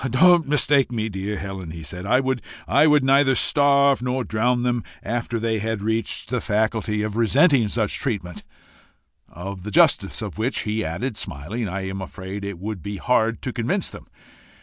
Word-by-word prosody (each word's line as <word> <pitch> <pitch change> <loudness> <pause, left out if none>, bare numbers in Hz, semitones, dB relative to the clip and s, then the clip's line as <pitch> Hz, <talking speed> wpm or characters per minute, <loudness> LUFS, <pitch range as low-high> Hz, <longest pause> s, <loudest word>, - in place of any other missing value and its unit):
"Don't 170 +5 +5
mistake 140 -2 +3
me, 110 -2 -2
dear 100 +1 -4
Helen," 95 -3 -6
he 80 0 -8
said. 90 +6 -7
"I 125 +4 +4
would 130 -2 -1 0.6
neither 135 0 +4
starve 140 -2 +4
nor 125 +1 -1
drown 120 +2 0
them 120 -2 0 0.2
after 120 +1 -2
they 110 -1 -1
had 110 -1 -3
reached 110 -1 -1
the 125 0 -1
faculty 110 0 0
of 105 -1 -3
resenting 125 +2 +4
such 110 -1 -1
treatment 100 -9 -4 0.9
of 95 +3 -7
the 105 - -6
justice 100 - +2
of - - -7
which," 125 +5 0
he 110 +1 -2
added, 95 +9 -3
smiling, 100 - -4
"I 95 +1 -4
am 95 0 -5
afraid 95 +1 -7
it 100 -2 -5
would 100 +1 -5
be 100 +4 -5
hard 115 0 +1
to 130 - -3
convince 160 - -1
them. - - -12
110 Hz, 170 wpm, -23 LUFS, 100-125 Hz, 0.9 s, Don't